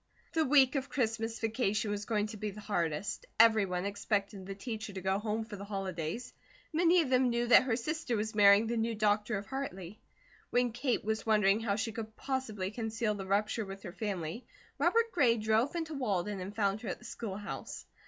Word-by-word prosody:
The 320 Hz, -, +3 dB
week 265 Hz, -2 st, +5 dB
of 275 Hz, -1 st, -2 dB
Christmas 225 Hz, -3 st, -1 dB
vacation 220 Hz, -2 st, 0 dB
was 205 Hz, 0 st, -3 dB
going 210 Hz, -3 st, 0 dB
to -, -, -7 dB
be 210 Hz, +1 st, -3 dB
the 205 Hz, +1 st, -9 dB
hardest; 175 Hz, -2 st, -2 dB
everyone 200 Hz, -5 st, +4 dB
expected 200 Hz, -1 st, -2 dB
the 195 Hz, -, -5 dB
teacher 220 Hz, 0 st, -5 dB
to 190 Hz, -, -5 dB
go 190 Hz, +1 st, +1 dB
home 220 Hz, +1 st, -2 dB
for 215 Hz, -2 st, -8 dB
the 195 Hz, -, -7 dB
Holidays. 195 Hz, 0 st, -4 dB, 0.4 s
Many 345 Hz, +2 st, +5 dB
of 265 Hz, -, -5 dB
them 255 Hz, 0 st, +4 dB
knew 240 Hz, 0 st, 0 dB
that 235 Hz, -, +8 dB
her 245 Hz, -4 st, +1 dB
sister 285 Hz, +1 st, -2 dB
was 220 Hz, +2 st, -2 dB
marrying 205 Hz, 0 st, +6 dB
the 235 Hz, +1 st, -1 dB
new 225 Hz, 0 st, 0 dB
doctor 210 Hz, +1 st, +1 dB
of 200 Hz, -, -6 dB
Hartley. 205 Hz, -7 st, -6 dB, 0.5 s
When 245 Hz, -1 st, +2 dB
Kate 245 Hz, -1 st, -1 dB
was 220 Hz, +1 st, -2 dB
wondering 210 Hz, -1 st, +4 dB
how 220 Hz, -3 st, 0 dB
she 225 Hz, +2 st, -2 dB
could 220 Hz, -1 st, -7 dB
possibly 220 Hz, -8 st, -3 dB
conceal 225 Hz, -1 st, -1 dB
the 195 Hz, -2 st, -6 dB
rupture 210 Hz, +3 st, +1 dB
with 195 Hz, 0 st, -8 dB
her 175 Hz, -4 st, -7 dB
family, 195 Hz, 0 st, -4 dB, 0.3 s
Robert 460 Hz, 0 st, +3 dB
Gray 250 Hz, -9 st, +3 dB
drove 220 Hz, +7 st, +1 dB
into 325 Hz, -2 st, -3 dB
Walden 205 Hz, -7 st, -1 dB
and 190 Hz, +3 st, -6 dB
found 205 Hz, -1 st, 0 dB
her 225 Hz, -, -5 dB
at -, -, -3 dB
the 240 Hz, -, -16 dB
schoolhouse. 205 Hz, -3 st, -6 dB
215 Hz, 200 wpm, -32 LUFS, 200-240 Hz, 0.5 s, that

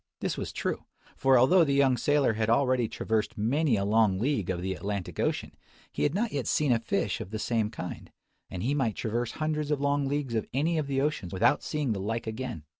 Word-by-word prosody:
This -, -, -2 dB
was -, -, -4 dB
true; -, -, -3 dB, 0.3 s
for 135 Hz, -1 st, +4 dB
although 170 Hz, +9 st, +6 dB
the 140 Hz, -3 st, +1 dB
young 135 Hz, -2 st, +4 dB
sailer 145 Hz, -1 st, +2 dB
had 110 Hz, 0 st, -1 dB
already 125 Hz, 0 st, +3 dB
traversed 110 Hz, 0 st, -2 dB
many 130 Hz, +5 st, +2 dB
a 100 Hz, -1 st, 0 dB
long 105 Hz, -2 st, +3 dB
league 115 Hz, -3 st, 0 dB
of 90 Hz, -2 st, -1 dB
the 95 Hz, 0 st, -1 dB
Atlantic 100 Hz, 0 st, -5 dB
Ocean, -, -, -1 dB, 0.4 s
he -, -, -5 dB
had 145 Hz, +3 st, +1 dB
not 220 Hz, +2 st, 0 dB
yet 140 Hz, -3 st, -2 dB
seen 150 Hz, -3 st, +2 dB
a 115 Hz, -, +3 dB
fish 115 Hz, -, -1 dB
of -, -, -7 dB
the 110 Hz, -, -4 dB
same 110 Hz, -1 st, 0 dB
kind; 90 Hz, -5 st, -7 dB, 0.4 s
and 90 Hz, -, -5 dB
he 135 Hz, +5 st, +1 dB
might 130 Hz, -7 st, 0 dB
traverse 115 Hz, +1 st, -2 dB
hundreds 155 Hz, -1 st, -2 dB
of 150 Hz, -2 st, +1 dB
long 145 Hz, 0 st, +1 dB
leagues 140 Hz, -3 st, -2 dB
of 110 Hz, -, -1 dB
any 160 Hz, +4 st, +1 dB
of 145 Hz, -, -2 dB
the 135 Hz, -1 st, 0 dB
oceans 140 Hz, -, -2 dB
without 95 Hz, +9 st, +3 dB
seeing 150 Hz, -5 st, -2 dB
the 100 Hz, -, -4 dB
like 115 Hz, +3 st, -2 dB
again. 110 Hz, -, -5 dB
125 Hz, 225 wpm, -28 LUFS, 110-145 Hz, 0.4 s, although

